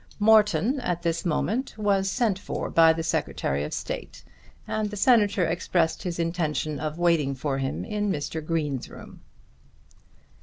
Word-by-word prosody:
Morton 220 +4 +4
at 175 -8 -2
this 170 +1 -1
moment 220 - -1
was 200 -2 +1
sent 220 -4 0
for - - -4
by 165 -1 +6
the 165 0 -2
Secretary 70 - -1
of 75 - -5
State, - - -6 0.4
and 215 -1 -1
the 210 - -7
Senator 205 -4 +4
expressed 165 -1 0
his 175 -2 -4
intention 160 -3 -1
of 155 +1 -4
waiting 165 -6 +2
for 135 0 -2
him 135 0 -3
in 210 -1 -1
Mr. 155 0 -3
Green's 150 -5 -2
room. - - -12
170 Hz, 150 wpm, -26 LUFS, 155-205 Hz, 0.4 s, by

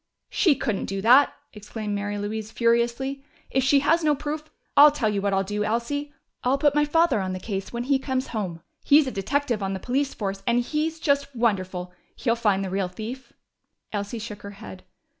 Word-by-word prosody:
"She 330 -8 +4
couldn't 220 -6 -2
do 195 0 -3
that!" 255 +5 +6 0.2
exclaimed 210 0 -5
Mary 205 0 -2
Louise 210 +1 -4
furiously. 235 +4 0 0.3
"If 265 - +2
she 275 +1 +4
has 330 +4 +3
no 300 -1 +3
proof... 300 +2 -4 0.3
I'll 290 +1 +10
tell 285 -7 0
you 200 -1 -1
what 200 0 0
I'll 195 0 +2
do, 205 +2 -2
Elsie! 240 +7 -2 0.3
I'll 255 +2 +2
put 290 0 +3
my 295 0 +3
father 325 -3 +3
on 185 0 -3
the 185 - -4
case 195 0 -4
when 235 0 -3
he 270 +1 +2
comes 260 -1 -2
home! 185 -7 -4 0.2
He's 290 +1 +6
a 260 - -3
detective 250 +2 -1
on 195 0 -1
the 190 - -4
police 270 +6 -1
force, 195 -2 -3
and 235 +1 +3
he's 315 +4 -2
just 280 -3 0
wonderful. 185 -6 -1 0.2
He'll 230 -3 0
find 205 -4 +1
the 185 - -5
real 190 -1 0
thief." 225 +8 -8 0.6
Elsie 205 +2 -3
shook 215 -2 -7
her 200 - -8
head. 195 -3 -10
235 Hz, 200 wpm, -25 LUFS, 205-280 Hz, 0.6 s, I'll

